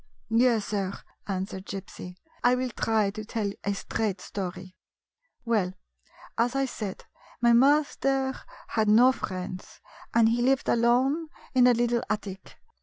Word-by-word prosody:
" - - -40 0.2
Yes, 230 -4 +2
sir," 195 -2 -2 0.3
answered 190 -1 -4
Gypsy, 190 -2 -7
" - - -32
I 245 +1 +5
will 250 0 -2
try 215 -2 +1
to 215 +1 -7
tell 210 -1 -2
a 200 0 -1
straight 205 -1 -2
story. 185 -1 -6 0.7
Well, 210 -6 +1 0.7
as 240 +3 +2
I 275 0 +2
said, 210 -6 -6 0.3
my 235 0 +4
master 270 0 +3 0.4
had 220 -2 +1
no 240 +5 +7
friends, 185 -5 -6 0.3
and 230 -1 +5
he 235 +1 +1
lived 265 +2 +2
alone 255 +7 +2 0.3
in 250 -1 +6
a 245 - +5
little 240 0 +1
attic. 200 -3 -5
225 Hz, 145 wpm, -27 LUFS, 195-250 Hz, 0.7 s, no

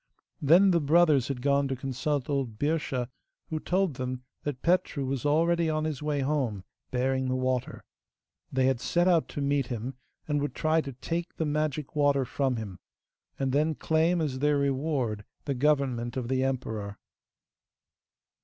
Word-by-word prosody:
Then 175 +7 +6
the 170 -2 +3
brothers 150 -3 +4
had 125 -3 -4
gone 140 0 +3
to 135 - -2
consult 135 +2 -2
old 135 -6 -2
Birscha, 145 -3 -1 0.4
who 155 - -1
told 180 -4 0
them 130 0 -4 0.2
that 145 -4 -5
Petru 170 -5 +1
was 135 +1 -1
already 165 +2 +3
on 155 0 0
his 155 -3 -3
way 150 -1 0
home 130 -9 -1 0.3
bearing 130 +1 0
the 130 - 0
water. 130 -1 -1 0.7
They 130 -1 +2
had 130 -2 +2
set 175 +1 +2
out 170 -3 +3
to 145 - -4
meet 140 -2 +1
him, 120 +1 -4 0.3
and 145 -1 0
would 145 - -3
try 160 0 +2
to 140 -3 -7
take 165 +7 -4
the 160 - -1
magic 150 -1 -2
water 145 -2 +3
from 130 +1 0
him, 100 -5 -6 0.6
and 135 -1 0
then 150 +3 +2
claim 165 +3 +2
as 135 -4 -2
their 145 +1 +3
reward 135 -6 0 0.2
the 140 - 0
government 130 -3 +1
of 125 -2 -3
the 130 0 +1
emperor. 110 -6 -3
140 Hz, 165 wpm, -28 LUFS, 130-155 Hz, 0.7 s, Then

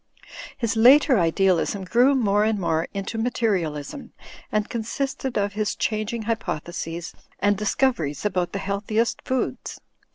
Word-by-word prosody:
His 230 -3 -1
later 255 +2 +6
idealism 185 +3 +1
grew 245 +8 +4
more 210 -5 +2
and 220 0 +1
more 165 -3 0
into 200 +3 -4
materialism 200 - -2 0.4
and 215 0 0
consisted 255 +2 -3
of 200 -1 0
his 210 0 -1
changing 215 +1 -2
hypotheses 175 -6 -4 0.2
and 205 0 +2
discoveries 200 - 0
about 180 -3 0
the - - -3
healthiest 205 +3 -1
foods. 260 -1 -3
210 Hz, 125 wpm, -24 LUFS, 185-235 Hz, 0.4 s, later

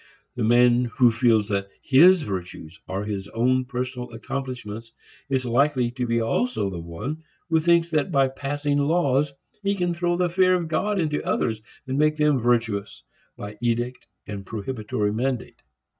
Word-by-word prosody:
The 125 - -2
man 120 +2 +4
who 120 0 +3
feels 115 -3 +3
that 100 -1 -1
his 165 +6 +6
virtues 90 - -6
are 95 +2 -3
his 100 -2 -4
own 130 +3 +1
personal 125 -1 -4
accomplishments 120 -3 -6 0.4
is 130 -2 0
likely 125 0 +2
to 125 0 -3
be 115 0 +1
also 115 - 0
the 90 - -5
one 85 - -6 0.3
who 160 - +4
thinks 170 +1 +3
that 155 +3 0
by 135 -3 +4
passing 145 +2 -2
laws 145 -2 +2 0.3
he 200 0 0
can 175 -2 0
throw 175 0 0
the 180 0 +2
fear 185 +1 +3
of 175 -2 -2
God 200 +6 0
into 150 -3 -1
others 110 -2 -1 0.2
and 135 +1 -2
make 155 0 +3
them 150 -3 +3
virtuous 115 -4 0 0.3
by 105 +1 -8
edict 120 +1 -2 0.2
and 100 -1 -6
prohibitory 105 -1 -3
mandate. 125 +2 -3
125 Hz, 160 wpm, -24 LUFS, 115-150 Hz, 0.4 s, his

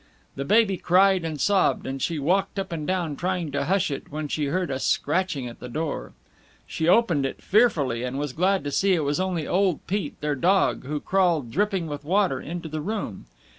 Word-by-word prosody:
The 140 - -4
baby 210 +2 +3
cried 185 +1 +4
and 155 -3 -4
sobbed, 195 +8 +2
and 135 0 -4
she 165 +3 -1
walked 180 +8 0
up 195 - -3
and 155 -3 -4
down 175 -5 -1
trying 175 -1 -2
to 140 - -1
hush 180 -1 +1
it 140 - -6
when 155 +1 -4
she 150 +1 -1
heard 175 +2 -1
a 130 - -2
scratching 150 -3 0
at 120 - -10
the 125 - -8
door. 140 - -4 0.5
She 160 - -2
opened 175 -7 +4
it 135 - -3
fearfully, 160 - +2
and 125 +1 -3
was 145 -2 -3
glad 190 +5 +1
to 145 - -3
see 195 +6 +2
it 160 - 0
was 145 +3 0
only 185 -4 -1
old 185 -3 +1
Pete, 190 -5 -3
their 150 0 -1
dog, 180 +2 +2
who 150 +2 -2
crawled, 170 -10 +1
dripping 195 - 0
with 145 -2 -6
water, 180 -4 +1
into 170 +1 -6
the 155 0 -4
room. 200 - -4
165 Hz, 210 wpm, -25 LUFS, 145-190 Hz, 0.5 s, cried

